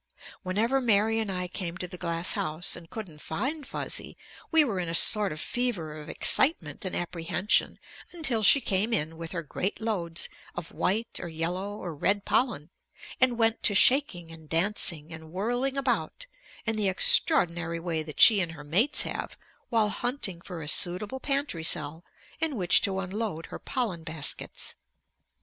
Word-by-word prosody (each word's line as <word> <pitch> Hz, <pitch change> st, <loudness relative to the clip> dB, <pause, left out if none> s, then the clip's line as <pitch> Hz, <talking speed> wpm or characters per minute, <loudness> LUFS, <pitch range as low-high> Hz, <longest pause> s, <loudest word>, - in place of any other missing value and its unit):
Whenever 220 Hz, +8 st, 0 dB
Mary 225 Hz, -1 st, +3 dB
and 215 Hz, -3 st, -2 dB
I 180 Hz, -1 st, -2 dB
came 175 Hz, -1 st, -5 dB
to 180 Hz, -, -5 dB
the 180 Hz, -, -10 dB
glass 170 Hz, -1 st, -2 dB
house 175 Hz, -5 st, -2 dB
and 170 Hz, -2 st, -12 dB
couldn't 175 Hz, -9 st, -9 dB
find 265 Hz, -, -4 dB
Fuzzy, -, -, -3 dB, 0.3 s
we 320 Hz, -2 st, +5 dB
were 205 Hz, -8 st, -3 dB
in 175 Hz, -2 st, -3 dB
a 165 Hz, -, +1 dB
sort 210 Hz, +2 st, +5 dB
of 155 Hz, -, -6 dB
fever 220 Hz, -10 st, -2 dB
of 150 Hz, -1 st, -10 dB
excitement 185 Hz, -, +3 dB
and 185 Hz, -, -3 dB
apprehension 175 Hz, +3 st, -1 dB, 0.3 s
until 310 Hz, -10 st, 0 dB
she 275 Hz, +6 st, +5 dB
came 205 Hz, +2 st, 0 dB
in 160 Hz, -6 st, -1 dB
with 165 Hz, 0 st, -8 dB
her 170 Hz, -2 st, -4 dB
great 185 Hz, +6 st, -3 dB
loads 175 Hz, -7 st, 0 dB, 0.3 s
of 175 Hz, -2 st, -7 dB
white 220 Hz, +5 st, -1 dB
or 175 Hz, -, -6 dB
yellow 175 Hz, +5 st, -4 dB
or 175 Hz, -5 st, -6 dB
red 200 Hz, +7 st, 0 dB
pollen 210 Hz, -, -1 dB, 0.5 s
and 250 Hz, -2 st, +2 dB
went 225 Hz, -1 st, +1 dB
to 205 Hz, -, +3 dB
shaking 195 Hz, -, +3 dB
and 160 Hz, -2 st, -13 dB
dancing 165 Hz, -2 st, +1 dB
and 160 Hz, 0 st, -11 dB
whirling 245 Hz, +8 st, -2 dB
about 275 Hz, -, -2 dB, 0.4 s
in 225 Hz, -1 st, -1 dB
the 205 Hz, -2 st, +1 dB
extraordinary 175 Hz, -, +2 dB
way 165 Hz, -2 st, -2 dB
that 155 Hz, -1 st, -10 dB
she 215 Hz, -3 st, +9 dB
and 170 Hz, -3 st, -2 dB
her 150 Hz, -2 st, -11 dB
mates 195 Hz, -, +3 dB
have -, -, -5 dB, 0.3 s
while 225 Hz, -3 st, +2 dB
hunting 210 Hz, -7 st, -2 dB
for 175 Hz, -3 st, -8 dB
a -, -, -8 dB
suitable 190 Hz, -, +1 dB
pantry 275 Hz, -, -1 dB
cell 160 Hz, +1 st, +3 dB, 0.4 s
in 320 Hz, -3 st, 0 dB
which 180 Hz, -6 st, +4 dB
to 190 Hz, -1 st, 0 dB
unload 190 Hz, -3 st, -4 dB
her -, -, -9 dB
pollen 215 Hz, -11 st, -3 dB
baskets. 160 Hz, -3 st, -1 dB
190 Hz, 170 wpm, -27 LUFS, 165-225 Hz, 0.5 s, she